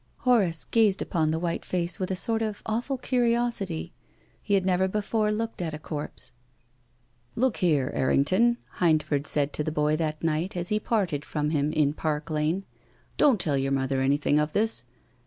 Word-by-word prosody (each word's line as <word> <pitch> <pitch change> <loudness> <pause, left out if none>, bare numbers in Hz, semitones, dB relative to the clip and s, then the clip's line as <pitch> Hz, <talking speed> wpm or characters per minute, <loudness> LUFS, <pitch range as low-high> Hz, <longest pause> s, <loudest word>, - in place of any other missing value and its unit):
Horace 200 -11 +2
gazed 215 -4 +3
upon 160 -3 0
the 160 - 0
white 170 0 -2
face 175 -1 -2
with 185 - -2
a 190 - -1
sort 225 +4 +1
of 215 -2 -3
awful 240 +5 -2
curiosity. 235 -8 0 0.5
He 205 - +1
had 190 -2 +1
never 190 0 +2
before 210 +2 0
looked 225 -1 -3
at 160 -3 -3
a - - -5
corpse. 150 -4 -6 0.5
" 125 +1 -40 0.3
Look 255 -1 +1
here, 150 -7 +1
Errington," 185 - +3 0.2
Hindford 155 -4 +2
said 145 -1 +2
to 150 - -2
the 155 - -2
boy 150 0 +1
that 155 -1 -3
night 165 +4 -1
as 175 0 +1
he 210 - +1
parted 185 -11 -1
from 150 -1 -2
him 150 -1 +1
in 150 -2 +2
Park 155 0 -3
Lane, 155 +5 0 0.3
" - - -35
don't 270 -8 +5
tell 145 -5 +1
your 135 0 -1
mother 135 0 0
anything 145 +2 +2
of 150 0 -1
this." 210 - 0
170 Hz, 185 wpm, -26 LUFS, 150-210 Hz, 0.5 s, don't